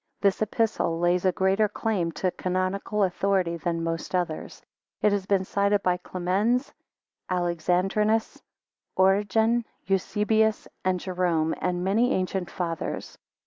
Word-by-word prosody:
This 200 -1 +2
Epistle 215 -5 0
lays 175 +2 +1
a 185 - +5
greater 195 +3 +2
claim 200 -6 -1
to 185 +2 -1
canonical 185 +4 -1
authority 185 -2 +1
than 165 -1 -2
most 165 +2 -3
others. 175 -3 -3 0.4
It 210 - +5
has 200 -2 -1
been 195 -2 +2
cited 200 +1 +1
by 180 -1 +2
Clemens, 195 +9 0 0.6
Alexandrinus, 185 +5 0 0.6
Origen, 205 +5 +3 0.2
Eusebius, 210 +3 +1 0.2
and 185 -1 +1
Jerome, 175 -4 0
and 180 -1 -1
many 225 +7 +2
ancient 185 -1 -2
Fathers. 165 -3 -4
190 Hz, 120 wpm, -26 LUFS, 180-210 Hz, 0.6 s, a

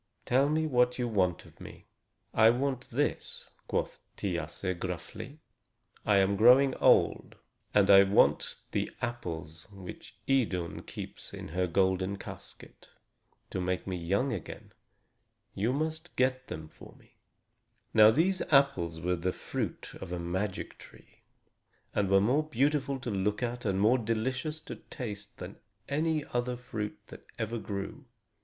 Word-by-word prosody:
Tell 135 +3 +3
me 155 +1 +1
what 125 -4 +2
you 125 -1 0
want 95 -6 +1
of - - -18
me?" - - -11 0.5
"I 110 0 +6
want 130 +1 -1
this," 145 +5 -2 0.2
quoth - - -2 0.2
Thiasse 95 -2 -2
gruffly. 95 - -6 0.7
"I 105 -2 +5
am 100 +1 +3
growing 130 +5 +7
old, - - +3 0.4
and 100 -1 +4
I 100 0 +10
want 100 +1 +3
the - - -1
apples 85 -9 -5
which 95 -3 -10
Idun 100 -11 0
keeps - - -5
in - - -8
her 90 +3 0
golden 95 +2 +1
casket, - - -11 0.6
to 95 - -2
make 90 0 -1
me 95 - -3
young 100 +10 0
again. 95 - -7 0.8
You 110 +5 0
must 155 +4 -3
get 130 0 +1
them 80 0 -6
for - - -15
me." - - -25 0.8
Now 110 -1 +8
these 180 +10 +2
apples 95 - +3
were 90 +2 0
the 90 +2 -1
fruit - - -5
of - - -7
a 90 - -2
magic 90 +3 -3
tree, - - -16 0.7
and 100 -2 +1
were 95 0 +6
more 125 +9 +3
beautiful 140 +1 +1
to 120 - -3
look 105 +3 0
at 120 0 -3
and 95 -2 +1
more 115 +6 +4
delicious 130 +7 -2
to - - -8
taste 105 -5 -7
than - - -8 0.3
any 155 +1 0
fruit 120 -5 -3
that - - -11
ever 115 +1 -2
grew. 100 +7 -5
110 Hz, 145 wpm, -30 LUFS, 95-130 Hz, 0.8 s, I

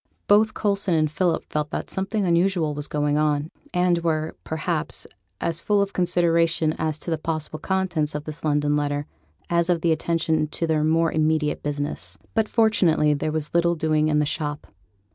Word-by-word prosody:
Both 215 +1 +4
Coulson 200 -4 +1
and 155 -1 +1
Philip 175 0 0
felt 150 -1 -2
that - - -4
something 195 +2 -1
unusual 170 -2 +2
was 145 0 -4
going 150 0 0
on, 150 0 0 0.2
and 180 -1 +2
were, 160 -1 -1
perhaps, 160 0 -2 0.3
as 165 0 -2
full 205 +2 +2
of 200 0 0
consideration 170 -3 +2
as 155 -1 -1
to 170 - -6
the 160 - 0
possible 155 -1 -3
contents 180 -5 -1
of 150 - -3
this 155 +1 -7
London 150 -1 +1
letter, 145 0 -1 0.4
as 170 0 +1
of 175 -1 +1
attention 160 -1 +1
to 165 - -2
their 155 -2 +1
more 165 +1 +2
immediate 155 -1 +1
business. 145 - -4 0.2
But 220 -1 +1
fortunately 180 -10 +3
there 150 +2 -2
was 155 -1 -3
little 170 0 +3
doing 155 -1 +1
in 150 -1 +2
the 150 - +2
shop. 145 0 -3
160 Hz, 175 wpm, -24 LUFS, 150-175 Hz, 0.4 s, Both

